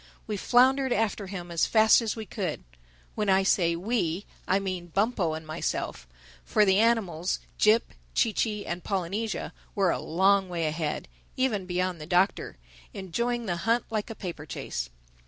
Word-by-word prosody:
We 215 - -3
floundered 260 +5 +4
after 215 -3 0
him 180 -3 -6
as 170 - +2
fast 220 +1 +6
as 225 -2 -2
we 220 -1 -6
could. 190 -7 -4 0.5
When 210 -2 -1
I 190 0 +4
say 170 -3 +3
we, 185 -1 -1 0.2
I 190 - +3
mean 185 -3 -3
Bumpo 195 -2 0
and 160 0 -7
myself; 155 - -3 0.4
for 210 - +3
the 190 0 +4
animals, 195 -7 +1 0.2
Jip, 215 +2 +4 0.2
Chee 225 - +3
Chee 210 -1 -1
and 175 - -4
Polynesia, 195 +3 -2 0.2
were 195 -3 +3
a - - -1
long 190 +3 +2
way 170 -2 -1
ahead—even 160 - -2
beyond 180 -2 -1
the 150 - -7
Doctor—enjoying 180 - -1
the 175 -4 -1
hunt 230 +7 +1
like 215 -2 -2
a 225 - -6
paper 170 -7 -7
chase. - - -4
190 Hz, 155 wpm, -27 LUFS, 170-220 Hz, 0.5 s, fast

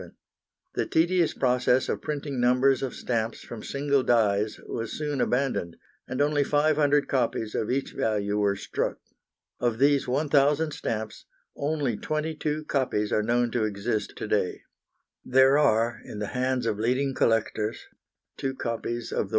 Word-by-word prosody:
The - - -1
tedious 170 0 +2
process 125 0 +2
of - - -2
printing 145 -3 -3
numbers 125 +2 +3
of 135 -2 -3
stamps 115 -2 -2
from 115 -2 -8
single 140 +2 0
dies 105 -4 +2
was 115 -1 -4
soon 150 -2 -2
abandoned, 125 -10 0 0.3
and 130 - -4
only 145 0 +2
500 145 0 +2
copies 115 -4 -1
of 110 - -1
each 135 +2 -1
value 105 -1 0
were 100 -1 +2
struck. 100 - -3 0.6
Of 120 -2 0
those 140 +2 +3
1,000 145 +3 +2
stamps 110 -7 -4 0.3
only 140 -6 -1
twenty 155 +1 -2
two 155 0 -2
copies 125 -8 0
are 105 - +3
known 120 +2 +1
to 120 -2 0
exist 105 0 -2
to - - -5
day. - - -1 0.6
There 135 +2 +5
are 120 -4 +2
in - - -8
the 105 -1 -3
hands 130 -1 0
of 110 -2 -1
leading 130 +4 +1
collectors 115 -3 0 0.6
two 135 0 -3
copies 115 -1 -3
of - - -1
the - - +1
1d. - - -13
125 Hz, 155 wpm, -26 LUFS, 110-145 Hz, 0.6 s, There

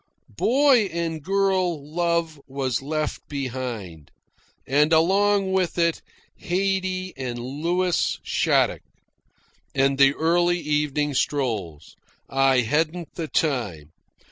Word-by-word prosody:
Boy 260 -2 +4
and 165 -3 -3
girl 185 -4 0
love 170 -3 0
was 130 -3 -2
left 155 +2 -3
behind, 120 - -5 0.6
and, 150 +4 +2
along 195 +4 +3
with 185 -2 0
it, 170 -1 +1 0.4
Haydee 185 0 -1
and 130 -3 -4
Louis 165 +9 -1
Shattuck, - - +1 0.9
and 135 0 +2
the 140 0 +5
early 175 +2 +2
evening 150 -1 0
strolls. 110 - -2 0.3
I 135 -1 +3
hadn't 160 +7 -1
the 165 -2 -4
time. 105 - -1
155 Hz, 100 wpm, -24 LUFS, 135-175 Hz, 0.9 s, the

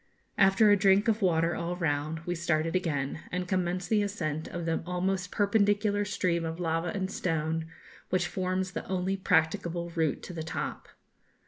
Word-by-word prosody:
After 195 +2 +6
a - - +7
drink 200 +2 +4
of 225 0 +2
water 170 -2 +2
all 170 +1 -2
round, 155 -1 -1
we 175 +2 -3
started 165 -1 0
again, 150 -6 -1
and 180 0 -2
commenced 180 0 -1
the 215 -1 +4
ascent 160 -7 -2
of 175 -1 -5
the 165 -1 0
almost 185 +1 -1
perpendicular 205 0 +2
stream 180 -4 0
of 165 +1 -4
lava 165 0 0
and 190 +2 -2
stone, 160 -2 -1 0.4
which 180 -1 +1
forms 185 +1 -2
the - - -4
only 185 +1 0
practicable 170 -1 +1
route 160 -4 0
to 180 - -7
the 165 - -4
top. 160 - -4
180 Hz, 165 wpm, -29 LUFS, 165-190 Hz, 0.4 s, a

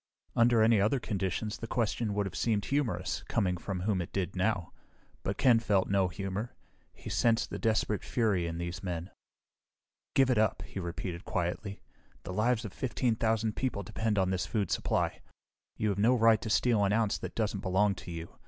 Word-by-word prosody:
Under 115 -1 +5
any 110 -2 +5
other 110 +7 +2
conditions, 105 +1 -2
the 115 - -5
question 115 -3 -1
would 105 -1 +1
have 95 - -5
seemed 105 -4 0
humorous, 135 -9 -1
coming 90 -2 +1
from 90 +1 -4
whom 95 -1 0
it 85 - -6
did 95 -1 -2
now. 95 -2 0 0.5
But - - -2
Ken 120 -3 +5
felt 100 -4 +1
no 100 -2 +3
humor; 95 +5 -4 0.4
he - - -13
sensed 115 -1 +2
the - - -4
desperate 110 -2 +1
fury 105 -8 +1
in 85 0 -4
these 85 +1 -4
men. 90 -1 -4 1.0
"Give 135 -1 +5
it 120 - +3
up," 110 -2 +1
he - - -7
repeated 85 0 -5
quietly. 90 +3 -3 0.4
"The 90 - -6
lives 115 +3 +1
of 105 - -7
fifteen 125 -2 0
thousand 110 -1 0
people 125 -6 -2
depend 110 +3 -1
on 95 -1 +2
this 95 -1 -1
food 100 -6 -1
supply. - - 0 0.6
You 105 - +1
have 100 -1 -1
no 120 +5 +5
right 115 -2 +5
to 110 - -4
steal 110 0 +3
an 100 0 +2
ounce 110 -2 +1
that - - -6
doesn't 105 -3 -1
belong 95 +2 +2
to 90 - -10
you. 85 0 -7
105 Hz, 190 wpm, -31 LUFS, 95-115 Hz, 1.0 s, Under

